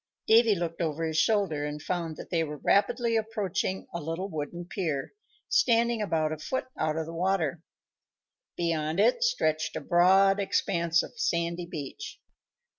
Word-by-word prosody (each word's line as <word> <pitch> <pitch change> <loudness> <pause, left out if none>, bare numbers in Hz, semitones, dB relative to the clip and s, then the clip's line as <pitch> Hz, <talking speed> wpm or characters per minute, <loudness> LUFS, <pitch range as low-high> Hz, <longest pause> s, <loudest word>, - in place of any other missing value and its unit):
Davy 225 -1 +5
looked 170 -2 -3
over 165 0 -1
his 160 0 0
shoulder 195 -9 +1
and 150 0 -4
found 165 -1 -3
that - - -10
they 165 -2 +2
were 150 -1 -5
rapidly 230 - +2
approaching 215 -4 -2
a 170 - -4
little 165 +5 -3
wooden 160 +3 -5
pier, 165 -7 -3 0.3
standing 235 -1 +3
about 160 -6 0
a 155 - -4
foot 260 +12 -3
out 155 0 -1
of 160 - -2
the 165 - -8
water. 170 -2 0 1.0
Beyond 165 -1 -1
it 235 - +3
stretched 155 - 0
a - - -1
broad 190 +3 +4
expanse 170 -4 +1
of - - -11
sandy 170 +1 -1
beach. 150 -6 -7
170 Hz, 155 wpm, -28 LUFS, 155-195 Hz, 1.0 s, Davy